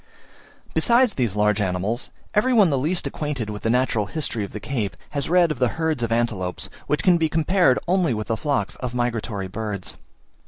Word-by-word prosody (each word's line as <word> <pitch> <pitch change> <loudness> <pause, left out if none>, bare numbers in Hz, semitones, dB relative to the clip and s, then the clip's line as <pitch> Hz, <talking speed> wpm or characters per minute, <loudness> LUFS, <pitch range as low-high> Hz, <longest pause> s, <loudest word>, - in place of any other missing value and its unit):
Besides 240 -2 +4
these 120 -6 0
large 105 0 +2
animals, 95 +6 -1 0.2
every 235 +5 +3
one 205 -8 +5
the - - +2
least 165 +7 -1
acquainted 140 -8 -3
with 105 - -6
the 115 - -1
natural 115 -4 +1
history 120 -5 -1
of 100 - -6
the 105 - -6
Cape, 110 -5 -3
has 140 0 -2
read 175 -1 +4
of 145 - -4
the 125 - +3
herds 160 -5 0
of 115 -1 -1
antelopes, 110 -6 -1 0.2
which 150 -2 0
can 180 -2 +5
be 160 -1 +2
compared 165 -3 +3
only 175 -8 +2
with 110 0 -3
the 115 - +2
flocks 145 +3 -1
of 125 -1 -5
migratory 115 -5 -2
birds. 105 -1 -4
125 Hz, 195 wpm, -23 LUFS, 105-160 Hz, 0.2 s, one